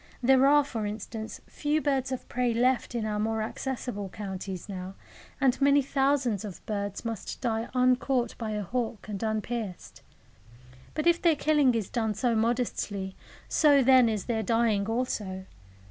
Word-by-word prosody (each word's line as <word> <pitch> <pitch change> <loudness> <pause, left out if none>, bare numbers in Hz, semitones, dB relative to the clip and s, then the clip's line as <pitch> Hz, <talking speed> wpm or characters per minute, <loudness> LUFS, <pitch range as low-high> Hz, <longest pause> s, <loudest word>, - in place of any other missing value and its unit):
There 265 +2 +5
are, 290 +1 +6
for 230 -7 -3
instance, 220 +1 -6
few 295 +1 -1
birds 270 -3 0
of 260 - -4
prey 245 -2 0
left 245 +1 +1
in 225 -2 -1
our 210 -1 -1
more 220 +1 0
accessible 235 -4 -4
counties 190 -2 -6
now, 190 -1 -6 0.4
and 270 -1 +2
many 280 0 +5
thousands 270 -6 +1
of 200 -4 -8
birds 205 0 -4
must 225 -3 -5
die 230 -2 -1
uncaught 250 -1 +2
by 225 -2 -3
a 210 -1 -2
hawk 230 +1 -3
and 205 -3 -5
unpierced. 220 -3 -4 0.9
But 305 - -1
if 340 0 +4
their 335 -3 +4
killing 290 -5 +3
is 220 -4 -1
done 220 -3 -1
so 235 +3 +1
modestly, 220 -4 -1 0.3
so 290 -3 +5
then 255 -2 +6
is 215 -3 -2
their 225 -2 -1
dying 220 -2 +1
also. 210 -5 -2
230 Hz, 160 wpm, -28 LUFS, 210-260 Hz, 0.9 s, are